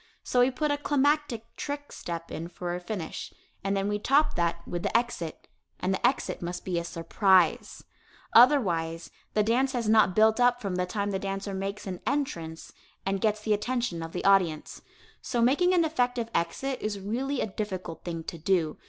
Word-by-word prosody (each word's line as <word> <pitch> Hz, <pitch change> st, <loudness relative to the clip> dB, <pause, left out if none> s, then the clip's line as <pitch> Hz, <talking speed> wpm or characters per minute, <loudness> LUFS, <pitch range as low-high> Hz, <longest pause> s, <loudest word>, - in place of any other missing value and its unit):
So 250 Hz, -, +1 dB
we 245 Hz, +1 st, +6 dB
put 295 Hz, +3 st, -1 dB
a 290 Hz, -, 0 dB
climactic 290 Hz, -5 st, 0 dB
"trick" 290 Hz, 0 st, -5 dB
step 170 Hz, -1 st, -6 dB
in 165 Hz, -, -5 dB
for 175 Hz, 0 st, -5 dB
a 175 Hz, -, -3 dB
finish, 180 Hz, -2 st, -5 dB, 0.3 s
and 195 Hz, 0 st, 0 dB
then 195 Hz, 0 st, 0 dB
we 205 Hz, 0 st, -1 dB
top 280 Hz, +7 st, +3 dB
that 170 Hz, 0 st, -1 dB
with 175 Hz, -, -3 dB
the -, -, +2 dB
exit, 235 Hz, -9 st, -4 dB, 0.3 s
and 185 Hz, +1 st, 0 dB
the -, -, -3 dB
exit 250 Hz, +3 st, +1 dB
must 175 Hz, +1 st, -5 dB
be 180 Hz, -2 st, 0 dB
a -, -, -4 dB
surprise. 180 Hz, +1 st, +2 dB, 0.5 s
Otherwise, 175 Hz, -, +4 dB, 0.2 s
the 210 Hz, -, +4 dB
dance 255 Hz, +5 st, +2 dB
has 240 Hz, -3 st, -1 dB
not 215 Hz, -4 st, +4 dB
built 220 Hz, +2 st, +4 dB
up 245 Hz, 0 st, +4 dB
from 200 Hz, -5 st, -3 dB
the 180 Hz, 0 st, -1 dB
time 205 Hz, +1 st, -2 dB
the 190 Hz, -, -1 dB
dancer 195 Hz, 0 st, -4 dB
makes 195 Hz, +2 st, -4 dB
an 185 Hz, -2 st, -5 dB
entrance 170 Hz, -, -3 dB, 0.3 s
and 195 Hz, 0 st, -1 dB
gets 215 Hz, -1 st, +1 dB
the 215 Hz, 0 st, +1 dB
attention 235 Hz, -4 st, -1 dB
of 165 Hz, 0 st, -6 dB
the 180 Hz, -, -4 dB
audience. 185 Hz, -6 st, +2 dB, 0.4 s
So 240 Hz, -, -2 dB
making 280 Hz, +10 st, +4 dB
an 340 Hz, -2 st, +4 dB
effective 245 Hz, -6 st, 0 dB
exit 255 Hz, +11 st, -1 dB
is 210 Hz, -1 st, -2 dB
really 250 Hz, +8 st, -2 dB
a -, -, +1 dB
difficult 190 Hz, -5 st, -5 dB
thing 165 Hz, -2 st, -4 dB
to 170 Hz, -, -7 dB
do. 170 Hz, -2 st, +1 dB
205 Hz, 190 wpm, -28 LUFS, 175-245 Hz, 0.5 s, we